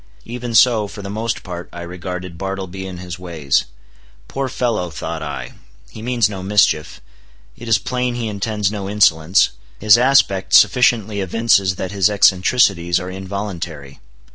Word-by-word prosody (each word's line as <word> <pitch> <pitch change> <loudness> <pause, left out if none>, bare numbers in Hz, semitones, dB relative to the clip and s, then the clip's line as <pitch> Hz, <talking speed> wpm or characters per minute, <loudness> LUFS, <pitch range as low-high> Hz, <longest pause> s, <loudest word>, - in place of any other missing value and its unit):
Even 120 -1 -5
so, 110 -3 +4
for 100 0 -10
the 100 - -6
most 110 +2 -3
part, 90 -1 -7
I 85 - -8
regarded 90 0 -7
Bartleby 95 0 -5
and 90 -2 -8
his 90 -1 -7
ways. 80 -7 -1 0.6
Poor 135 -1 -3
fellow! 115 -8 -1
thought 80 +1 -6
I, 70 -5 -6 0.4
he 110 - -10
means 120 -2 +1
no 100 -3 -7
mischief; 95 -6 +1 0.5
it 120 - -11
is 110 -2 +4
plain 125 +3 -2
he 120 -2 -3
intends 105 -1 -2
no 100 -2 -5
insolence; 90 -4 +3 0.3
his 110 +2 +6
aspect 125 -7 +3
sufficiently 110 -5 +4
evinces 95 -1 +2
that 95 +1 -5
his 100 0 +2
eccentricities 95 -3 +3
are 90 +1 -6
involuntary. 95 -7 -6
95 Hz, 150 wpm, -19 LUFS, 90-110 Hz, 0.6 s, his